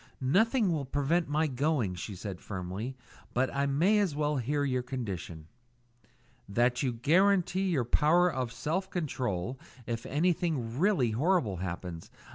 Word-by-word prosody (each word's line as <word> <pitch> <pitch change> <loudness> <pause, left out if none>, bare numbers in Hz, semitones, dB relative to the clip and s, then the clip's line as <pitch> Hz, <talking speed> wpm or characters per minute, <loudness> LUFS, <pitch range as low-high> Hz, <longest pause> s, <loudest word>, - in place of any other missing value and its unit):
"Nothing 205 - +3
will 150 -4 -1
prevent 145 +5 0
my 155 +2 +2
going," 135 -7 0
she 95 +3 -6
said 95 -1 -6
firmly; 100 +7 -5 0.4
"but 130 +2 +1
I 140 0 +1
may 175 +10 +3
as 190 -8 +1
well 150 0 0
hear 145 +4 0
your 130 -2 0
condition." 100 - -5 1.0
"That 120 +4 +2
you 130 - +1
guarantee 185 +8 +2
your 140 -9 +1
power 160 +8 +4
of 130 -8 -2
self 170 +9 -2
control 125 - -2 0.3
if 115 -1 -4
anything 155 -6 0
really 165 - +3
horrible 130 - +1
happens. 85 -1 -5
135 Hz, 140 wpm, -30 LUFS, 115-165 Hz, 1.0 s, power